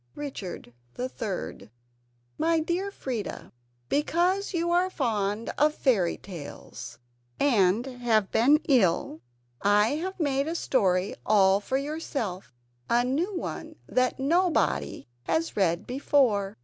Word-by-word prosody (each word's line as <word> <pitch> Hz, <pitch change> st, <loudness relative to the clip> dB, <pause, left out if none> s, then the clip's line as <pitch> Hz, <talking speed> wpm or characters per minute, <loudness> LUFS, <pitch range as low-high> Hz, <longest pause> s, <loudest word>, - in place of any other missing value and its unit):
[Richard 210 Hz, -, -7 dB, 0.2 s
III] 225 Hz, -, -4 dB, 0.7 s
My 330 Hz, 0 st, +3 dB
Dear 345 Hz, +5 st, -1 dB
Freda: 250 Hz, -, -5 dB, 0.4 s
Because 350 Hz, -, +1 dB
you 345 Hz, -1 st, 0 dB
are 355 Hz, +2 st, +3 dB
fond 220 Hz, -, -1 dB
of 300 Hz, +1 st, +3 dB
fairytales, 175 Hz, -, -2 dB, 0.4 s
and 225 Hz, -4 st, +3 dB
have 240 Hz, -6 st, 0 dB
been 285 Hz, +7 st, +4 dB
ill, 185 Hz, -, +2 dB, 0.4 s
I 205 Hz, +2 st, +4 dB
have 375 Hz, +4 st, -5 dB
made 280 Hz, -2 st, +1 dB
you 325 Hz, -, -1 dB
a -, -, -6 dB
story 195 Hz, -, +1 dB
all 195 Hz, -2 st, +4 dB
for 260 Hz, +6 st, -1 dB
yourself 275 Hz, -, -4 dB, 0.4 s
a 240 Hz, +1 st, +3 dB
new 330 Hz, +10 st, -1 dB
one -, -, -5 dB
that 255 Hz, +1 st, 0 dB
nobody 335 Hz, -, +1 dB, 0.2 s
has 325 Hz, -, -1 dB
read 170 Hz, -4 st, +1 dB
before. 245 Hz, -7 st, +1 dB
255 Hz, 115 wpm, -27 LUFS, 200-310 Hz, 0.7 s, been